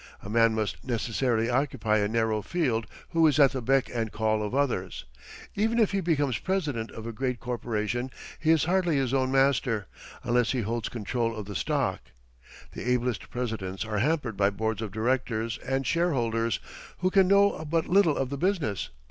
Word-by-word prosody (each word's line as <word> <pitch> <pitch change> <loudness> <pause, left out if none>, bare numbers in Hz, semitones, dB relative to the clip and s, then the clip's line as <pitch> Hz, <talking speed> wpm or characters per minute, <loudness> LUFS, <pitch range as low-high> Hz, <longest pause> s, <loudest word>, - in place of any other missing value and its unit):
A 100 - -7
man 115 0 +4
must 110 -2 -2
necessarily 115 -1 0
occupy 120 -4 +1
a 105 - +1
narrow 110 -1 0
field 125 - -1 0.2
who 165 -1 +4
is 150 -2 +2
at 140 -2 +7
the 130 - -3
beck 135 +3 +2
and 115 -3 -2
call 110 0 0
of 105 +4 -3
others. 120 - -1 0.5
Even 225 +3 +1
if 220 -4 +3
he 195 -1 0
becomes 145 -8 +1
president 150 -12 -2
of 110 - -9
a 115 - -4
great 125 +1 -2
corporation 120 0 -2 0.3
he 160 - -1
is 160 -2 +5
hardly 175 -1 +2
his 135 -2 0
own 130 -1 +1
master, 135 -6 +2 0.4
unless 120 0 +2
he 125 - 0
holds 115 +1 -2
control 115 +1 -2
of 105 -2 -5
the 100 - -7
stock. - - 0 0.7
The 125 - -5
ablest 125 -3 -1
presidents 110 -6 -3
are 105 -2 -2
hampered 130 -5 0
by 100 0 +4
boards 110 +2 -2
of 110 -3 -4
directors 115 0 -1
and 135 +1 -2
shareholders, 115 -10 +1 0.4
who 185 0 +2
can 190 -1 +5
know 200 -3 +4
but 165 0 +1
little 180 -4 +4
of 135 0 -1
the 140 - -3
business. 170 - 0
125 Hz, 180 wpm, -27 LUFS, 110-145 Hz, 0.7 s, at